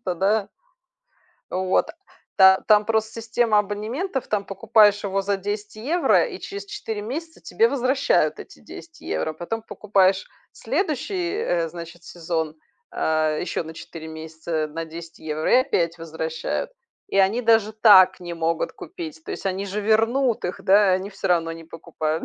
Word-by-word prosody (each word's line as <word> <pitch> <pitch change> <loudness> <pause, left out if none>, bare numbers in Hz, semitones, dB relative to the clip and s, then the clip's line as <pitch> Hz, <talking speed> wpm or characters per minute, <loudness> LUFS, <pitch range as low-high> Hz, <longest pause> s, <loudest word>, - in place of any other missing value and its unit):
тогда 195 +4 +1 1.0
Вот. 185 0 +1 0.5
Та 190 0 +7
там 210 -1 +5
просто 220 0 0
система 225 -1 +2
абонементов, 230 - -3
там 205 -2 -1
покупаешь 205 0 +3
его 195 0 0
за 200 0 0
10 205 +2 -5
евро 305 +11 +2
и - - -8
через 400 0 -7
4 400 - -5
месяца 315 +10 -6
тебе 455 +1 +2
возвращают 265 +1 +1
эти - - -12
10 330 -1 -12
евро. 155 - -2
Потом 195 +8 -5
покупаешь 195 -2 +1 0.3
следующий, 345 - -2
э, 170 - 0
значит, 170 0 -10
сезон, 160 -2 -4 0.3
а, 155 -1 0
ещё 175 - -2
на 160 0 -9
4 160 0 -9
месяца 160 0 -4
на 165 +2 -5
10 165 +1 -10
евро, 155 0 -3
и - - +8
опять 170 - 0
возвращают. 160 - -4 0.4
И 195 - 0
они 195 +5 +3
даже 225 -2 +3
так 210 -4 +7
не 175 -1 -6
могут 165 0 -1
купить, 325 -3 -9
то - - -8
есть - - -5
они 190 +1 -2
же 205 +2 -3
вернут 225 +4 +2
их, 180 - -3
да, 200 0 +5
они 190 +2 -1
всё 195 - -4
равно 165 -2 +2
не 165 0 -9
покупают. 160 -1 -4
200 Hz, 155 wpm, -23 LUFS, 170-225 Hz, 1.0 s, и